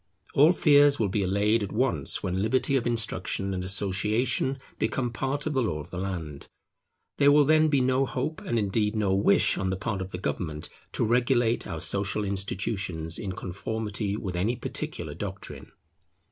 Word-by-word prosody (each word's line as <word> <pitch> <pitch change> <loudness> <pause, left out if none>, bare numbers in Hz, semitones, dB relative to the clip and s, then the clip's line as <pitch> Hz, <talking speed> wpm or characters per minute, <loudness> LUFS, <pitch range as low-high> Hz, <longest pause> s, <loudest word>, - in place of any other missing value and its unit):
All 150 +4 +6
fears 145 -4 +5
will 105 -3 0
be 100 +2 0
allayed 100 +4 +2
at 100 - -3
once 105 - 0
when 95 0 -1
liberty 130 +5 +1
of 120 -3 +1
instruction 100 -4 -1
and 90 -1 -3
association 105 +7 0 0.2
becomes 125 -3 -1
part 135 +4 -2
of 155 - -1
the 135 - +2
law 105 -10 -1
of 75 +3 -9
the 90 - -4
land. 85 -7 -5 0.7
There 145 0 +6
will 145 0 +6
then 155 +1 +5
be 140 -3 +2
no 130 +1 +2
hope, 140 +6 -3
and 120 - -2
indeed 105 +1 0
no 105 -3 +1
wish, 100 +1 +4
on 95 -1 -1
the 95 - -1
part 100 -1 -3
of 95 -1 -5
government 75 -3 -3 0.2
to - - +1
regulate 120 0 +2
our 80 - -4
social 100 +4 -1
institutions 95 -4 -2
in 95 -3 -4
conformity 105 +2 -3
with 95 -4 -4
any 105 +8 0
particular 120 - -4
doctrine. - - -7
105 Hz, 175 wpm, -27 LUFS, 95-125 Hz, 0.7 s, All